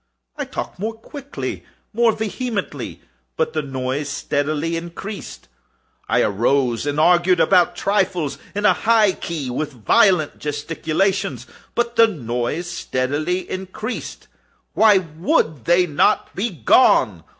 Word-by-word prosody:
I - - -4
talked - - -6
more 220 +3 -3
quickly—more 235 -2 -3
vehemently; 220 +1 -4 0.4
but 475 -1 0
the - - 0
noise 135 +1 -3
steadily 145 +3 -1
increased. 175 +5 -7 0.6
I - - +3
arose 120 +4 +1
and 145 +1 -1
argued 175 +2 +4
about 180 -1 +4
trifles, 185 -7 0 0.2
in 205 +1 -1
a 200 - +6
high 220 0 +3
key 165 -6 -5
and 125 - -4
with 155 -2 -3
violent 155 - +3
gesticulations; 155 +5 -1 0.3
but 240 0 -1
the 230 0 +7
noise 125 - -3
steadily 155 +5 -2
increased. 190 +5 -6 0.5
Why 215 -3 +6
would 160 - -1
they 175 +1 +4
not 160 +6 +1
be 215 +5 -1
gone? 150 - +3
175 Hz, 120 wpm, -21 LUFS, 145-210 Hz, 0.6 s, the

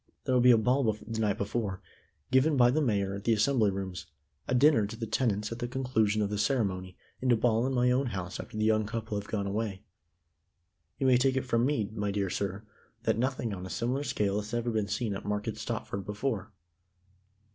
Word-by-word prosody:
There'll 125 -1 +2
be 125 - +6
a 120 - +8
ball 125 +5 +2
the 110 +1 -6
night 105 -3 +1
before, 100 -2 -2 0.5
given 135 +3 +4
by 120 -1 +6
the 155 +4 +1
Mayor 100 -7 +1
at 100 0 -6
the 115 - +3
Assembly 110 -1 +3
Rooms, 95 -2 -5 0.4
a 125 - +1
dinner 130 -5 +5
to 110 - -7
the 115 0 -4
tenants 105 -2 0
at 115 - -5
the 120 - -2
conclusion 115 -5 +1
of 100 - -2
the 105 - -2
ceremony, 95 -8 -1 0.2
and 130 -1 +2
a - - +6
ball 115 +1 +2
in 135 - -1
my 125 0 +3
own 130 +2 +2
house 95 -5 -5
after - - -7
the 110 - +1
young 110 -1 +2
couple 110 -1 -4
have 100 - -10
gone 100 -2 -1
away. 100 -1 -3 1.1
You 135 - -1
may 130 -1 +6
take 130 +1 +2
it 130 - -1
from 120 0 +2
me, 115 -9 -1
my 105 -2 -2
dear 100 -2 -1
sir, 100 +1 -3 0.4
that - - +1
nothing 125 -3 -1
on 90 -2 -6
a 95 - -6
similar 120 +10 -1
scale 105 -6 0
has 105 +3 -5
even 120 0 -1
been 110 -2 0
seen 105 +1 -1
at 100 - -5
Market 105 0 -2
Stopford 100 - -4
before." 105 0 -3
110 Hz, 215 wpm, -30 LUFS, 100-125 Hz, 1.1 s, a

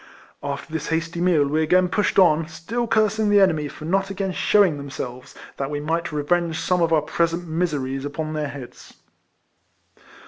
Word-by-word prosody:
After 140 +3 -5
this 160 -1 -3
hasty 165 +1 -2
meal, 170 -6 +3
we 155 +3 +1
again 180 +3 +3
pushed 205 +3 0
on, 165 -4 +5
still 210 +9 -4
cursing 215 -1 +2
the 205 0 +5
enemy 160 -6 +3
for 155 - -10
not 195 +3 0
again 195 -1 -2
shewing 190 -4 +3
themselves, 130 -3 -7 0.2
that 135 0 -3
we 145 0 -3
might 165 +3 -2
revenge 160 +2 0
some 180 -1 +1
of 165 -1 +2
our 155 -2 +3
present 170 +2 -1
miseries 145 -5 -2
upon 155 +2 -4
their 150 -1 -2
heads. 135 -3 -11
165 Hz, 170 wpm, -23 LUFS, 150-180 Hz, 0.2 s, on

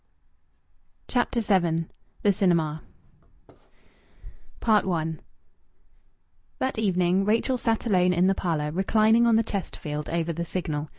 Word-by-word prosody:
CHAPTER 245 -1 0
VII 170 -6 +1 0.4
THE 205 - +4
CINEMA 165 -5 +1 1.8
I 180 -8 +1 1.4
That 260 -3 -2
evening 185 -2 +1
Rachel 225 +5 +1
sat 225 -1 -1
alone 180 -5 +3
in 180 0 +2
the 195 - +4
parlour, 155 -5 -2
reclining 215 +6 +3
on 230 - +4
the 225 - +3
Chesterfield 150 -8 -5
over 170 0 -1
the 170 +2 -3
Signal. 155 -4 -4
185 Hz, 110 wpm, -25 LUFS, 165-215 Hz, 1.8 s, THE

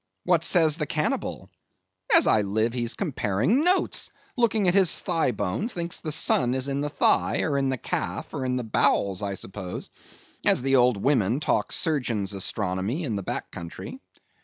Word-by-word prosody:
What 170 -2 +2
says 160 -3 +4
the 150 -3 -3
Cannibal? 150 0 -3 0.6
As - - +7
I 110 - +4
live 110 +3 -1
he's 120 -2 -1
comparing 150 - 0
notes; 365 +2 +1 0.3
looking 225 -5 +1
at 175 - +3
his 190 -4 +5
thigh 165 -7 0
bone; 105 - -2
thinks 170 -6 -3
the 155 - -4
sun 130 -4 +3
is 130 +1 -1
in 140 0 -2
the 150 - -2
thigh, - - +2
or 145 - -1
in 135 -1 +1
the 130 - -1
calf, - - -4
or 135 - -3
in 125 -1 -1
the 125 - -2
bowels, 100 -3 +1
I 100 -1 -3
suppose, 95 -1 -7 0.5
as - - +3
the 135 0 +2
old 125 -3 +4
women 120 0 +1
talk 150 - 0
Surgeon's 120 - -1
Astronomy 100 - -2
in 120 -8 -2
the 100 - -3
back - - -5
country. 85 - -8
130 Hz, 180 wpm, -25 LUFS, 105-160 Hz, 0.6 s, As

